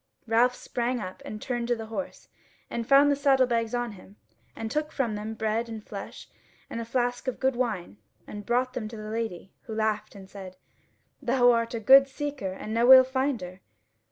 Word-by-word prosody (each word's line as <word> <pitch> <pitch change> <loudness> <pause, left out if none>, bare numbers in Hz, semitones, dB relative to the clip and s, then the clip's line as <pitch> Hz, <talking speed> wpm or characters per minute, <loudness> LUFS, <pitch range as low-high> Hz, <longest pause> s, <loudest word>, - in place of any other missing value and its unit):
Ralph 240 +2 +3
sprang 245 0 -2
up 185 -3 -7
and 215 - -6
turned 240 0 -3
to 240 - +1
the 225 -1 -7
horse, 225 +6 -6 0.4
and 230 -1 -3
found 280 +1 +6
the - - +3
saddle 275 -2 +3
bags 230 -1 -1
on 240 -1 -2
him, 200 0 -15 0.4
and 225 -1 -5
took 305 +2 -1
from 240 -6 -1
them 210 +1 -5
bread 220 +1 -1
and 220 -2 -7
flesh, 200 - -8 0.4
and 230 - -3
a - - -5
flask 245 +2 -1
of 255 - -2
good 265 -1 +1
wine, 210 - -3 0.3
and 205 0 -8
brought 250 +4 0
them 245 -4 -4
to 225 +1 -9
the 215 0 -7
Lady, 220 -5 -4
who 225 -3 -6
laughed 215 -1 -1
and 195 -1 -11
said: 190 -1 -10 0.6
"Thou 245 -1 +4
art 230 0 0
a - - -2
good 270 +5 +7
seeker 275 -7 -4
and 215 +3 -6
no 235 +3 +5
ill 260 0 +11
finder." 255 -9 -3
235 Hz, 200 wpm, -27 LUFS, 215-255 Hz, 0.6 s, ill